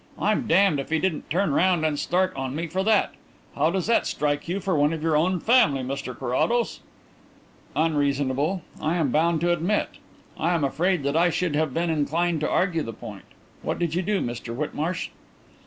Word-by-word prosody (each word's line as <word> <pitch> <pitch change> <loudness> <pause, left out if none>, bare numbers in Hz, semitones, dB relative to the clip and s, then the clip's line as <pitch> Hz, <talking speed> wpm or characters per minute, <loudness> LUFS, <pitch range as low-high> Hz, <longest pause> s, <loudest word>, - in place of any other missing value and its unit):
I'm 210 +1 0
damned 185 -3 +4
if 135 - -5
he 160 - +2
didn't 165 -1 -2
turn 175 -2 +1
round 175 0 +2
and 150 -2 0
start 185 +1 0
on 135 0 -4
me 165 +2 -2
for 185 +4 -2
that. 215 0 +2 0.4
How 150 +3 +2
does 185 0 -1
that 230 +1 +2
strike 145 0 -1
you 180 +4 -1
for 195 -3 -1
one 145 +1 +3
of 160 -1 -5
your 160 -1 +2
own 180 +4 +2
family, 155 - +3
Mr 130 -1 -5
Carrados?" 135 - 0 1.0
"Unreasonable, 145 +2 0 0.2
I 160 +3 0
am 155 -7 +1
bound 160 +2 +2
to 175 0 +3
admit. 175 +5 0 0.5
I 175 - +1
am 160 - 0
afraid 160 +4 +1
that 140 +2 -1
I 170 +2 +4
should 175 -3 -1
have 155 -1 +1
been 170 0 0
inclined 160 +2 0
to 150 - -1
argue 180 -3 +1
the 115 -5 -5
point. - - -10 0.4
What - - -2
did 170 -3 -1
you 175 - +1
do, 200 +2 0
Mr 120 -1 -4
Whitmarsh?" 155 +5 -3
165 Hz, 195 wpm, -25 LUFS, 145-180 Hz, 1.0 s, damned